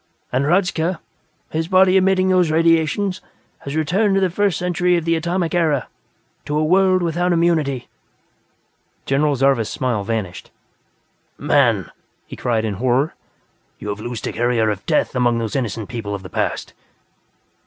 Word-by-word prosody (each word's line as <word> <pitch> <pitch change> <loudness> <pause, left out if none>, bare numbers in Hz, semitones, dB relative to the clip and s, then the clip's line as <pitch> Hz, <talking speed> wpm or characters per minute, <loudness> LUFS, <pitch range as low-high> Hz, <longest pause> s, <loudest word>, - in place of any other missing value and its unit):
And 130 +2 +1
Hradzka, 175 0 +1 0.5
his 160 +1 -2
body 185 0 +4
emitting 190 0 +3
those 180 -3 +3
radiations, 165 +4 +1 0.4
has 140 +1 -6
returned 190 +7 +1
to - - +3
the 190 -2 +1
First 200 -1 +1
Century 180 0 +1
of 165 - -3
the 165 0 +2
Atomic 170 +1 -1
Era 160 -6 +1 0.6
to 150 - -2
a 155 - +1
world 185 +2 +3
without 175 +2 0
immunity." 155 -7 +1 1.2
General 145 +1 +1
Zarvas' 130 -4 +2
smile 125 -7 -2
vanished. 105 -4 -4 0.9
"Man!" - - +2 0.3
he - - -9
cried 115 -2 -1
in 105 - -2
horror. 130 +4 +1 0.6
"You 105 - -7
have 105 0 -4
loosed 120 0 -5
a - - -3
carrier 115 -2 +1
of 100 -2 -5
death - - +1
among 120 -2 +2
those 115 -2 -3
innocent 115 -5 -2
people 110 -4 -5
of 95 - -8
the 95 - -9
past!" - - -2
155 Hz, 155 wpm, -20 LUFS, 120-180 Hz, 1.2 s, body